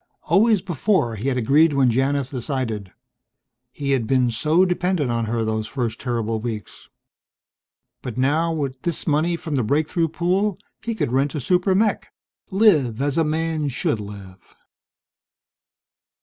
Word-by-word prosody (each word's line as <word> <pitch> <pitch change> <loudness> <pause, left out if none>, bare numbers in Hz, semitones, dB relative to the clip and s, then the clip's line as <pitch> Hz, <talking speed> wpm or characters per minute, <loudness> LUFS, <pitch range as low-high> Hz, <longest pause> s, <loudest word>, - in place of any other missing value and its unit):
Always 205 +3 +3
before 175 - 0
he 110 +5 -4
had 130 -2 0
agreed 145 +6 +4
when 135 -3 +3
Janith 135 +2 0
decided. 120 -7 -3 0.8
He 140 +1 -3
had 125 -5 +1
been 125 -2 +2
so 155 +10 +3
dependent 180 -6 0
on 115 -1 -1
her 115 0 -1
those 110 0 -2
first 115 -3 -3
terrible 115 -3 -2
weeks. 110 -4 -7 1.1
But 125 -2 -6
now, 150 +6 +2
with 140 -5 -3
this 170 -3 -2
money 160 +2 +1
from 160 -3 -4
the 125 - +1
breakthrough 155 - +1
pool, 185 +5 0 0.2
he 230 0 -3
could 120 - -1
rent 135 +4 +1
a - - -1
super 180 - +2
mech 210 +2 0 0.4
live 160 - +3
as 140 0 0
a 165 - +3
man 160 0 -1
should 125 -4 -1
live! 100 -2 -11
140 Hz, 150 wpm, -22 LUFS, 120-165 Hz, 1.1 s, agreed